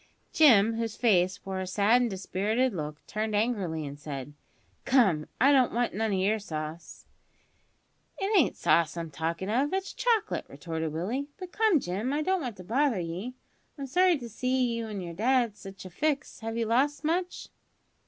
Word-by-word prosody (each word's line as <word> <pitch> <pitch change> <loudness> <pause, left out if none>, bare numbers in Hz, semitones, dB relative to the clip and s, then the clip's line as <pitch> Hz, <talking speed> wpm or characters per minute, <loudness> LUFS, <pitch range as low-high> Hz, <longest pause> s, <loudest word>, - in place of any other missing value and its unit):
Jim, 225 -7 +6
whose 225 -2 -3
face 190 -4 +2
wore 190 -1 -3
a 185 - -4
sad 210 +6 +3
and 245 - +1
dispirited 210 +5 -1
look, 150 -3 -6
turned 215 0 -2
angrily 200 -8 -1
and 145 0 -8
said, 145 -1 -7 0.5
"Come, 195 - +3
I 270 +4 +6
don't 260 -3 +4
want 240 0 0
none 220 +1 -1
o' - - +1
your 200 +4 +1
sauce!" 155 -3 -7 1.1
"It 400 +3 0
ain't 345 -9 +4
sauce 165 0 +2
I'm 165 -2 -5
talkin' 165 +5 -3
of, 270 +6 +1
it's 385 0 -2
chocolate," 455 -4 0
retorted 160 -2 -4
Willie. 220 - -3
"But 365 -1 -8
come, 430 -7 +3
Jim, 210 +7 -3
I 300 +1 0
don't 375 +2 +1
want 245 -7 -5
to 185 - -9
bother 250 +2 +1
ye. 180 +9 -5 0.4
I'm 280 - -5
sorry 355 +5 +3
to 240 -4 -8
see 255 +2 0
you 230 -1 -4
an 205 -3 -5
yer 170 -1 -6
dad 240 +5 +2
in - - -24
sitch 195 -1 -11
a 185 - -9
fix. 295 - -2
Have 225 0 -4
you 230 - 0
lost 270 +7 +1
much?" 350 +3 -2
220 Hz, 185 wpm, -28 LUFS, 180-265 Hz, 1.1 s, Jim